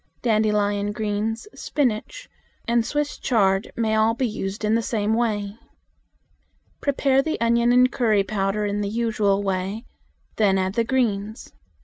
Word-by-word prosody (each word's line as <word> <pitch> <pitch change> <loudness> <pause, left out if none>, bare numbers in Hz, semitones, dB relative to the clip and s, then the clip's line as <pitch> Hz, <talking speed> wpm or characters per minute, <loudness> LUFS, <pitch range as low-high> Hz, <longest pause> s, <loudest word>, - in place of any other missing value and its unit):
Dandelion 210 -2 +1
greens, 215 - -2
spinach, 280 - -2 0.5
Swiss 295 +5 -2
chard, 195 -4 +1
may 220 -2 0
all 220 +1 +3
be 255 +1 0
used 205 -1 -4
in 210 - +2
the 230 - +2
same 215 -1 -1
way. 215 -3 -1 1.2
Prepare 275 -1 +2
the 315 +3 -3
onion 235 +1 +3
and 250 +1 +5
curry 215 -5 +2
powder 195 +1 -1
in 205 0 -1
the 200 - -2
usual 215 -3 0
way; 195 +4 -2 0.5
then 200 -3 +3
add 190 0 -1
the 230 - +1
greens. 220 -4 -2
215 Hz, 135 wpm, -23 LUFS, 205-235 Hz, 1.2 s, and